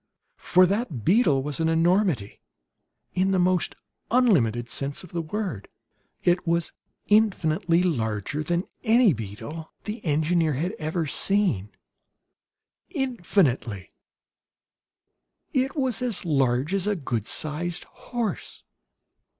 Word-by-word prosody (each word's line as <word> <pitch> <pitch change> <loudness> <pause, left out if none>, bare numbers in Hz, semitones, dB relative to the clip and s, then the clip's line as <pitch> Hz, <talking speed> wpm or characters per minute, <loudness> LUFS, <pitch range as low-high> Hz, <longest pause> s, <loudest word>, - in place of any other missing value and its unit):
For 185 +1 +5
that 185 - -2
beetle 165 - +4
was 145 0 -2
an 160 0 +2
enormity 165 - +1 0.7
in 185 +1 +1
the 190 - +2
most 180 -1 +1 0.3
unlimited 135 - +3
sense 140 +6 -3
of 180 - -13
the 170 - -2
word. 165 - -4 0.6
It 175 0 +2
was 170 0 0 0.3
infinitely 180 -5 +2
larger 120 - -1
than 170 +3 0 0.2
any 230 -4 +5
beetle 115 +9 -7
the 215 +2 -6
engineer 160 +1 +1
had 165 +8 -1
ever 160 +2 -1
seen 165 - 0 1.2
infinitely! 175 - 0 1.6
It 265 +1 0
was 260 -7 0
as 235 -7 0
large 135 0 +1
as 195 0 0
a 210 - +1
good 120 - -3
sized 160 +3 -2
horse! 235 -6 -5
170 Hz, 110 wpm, -25 LUFS, 140-200 Hz, 1.6 s, For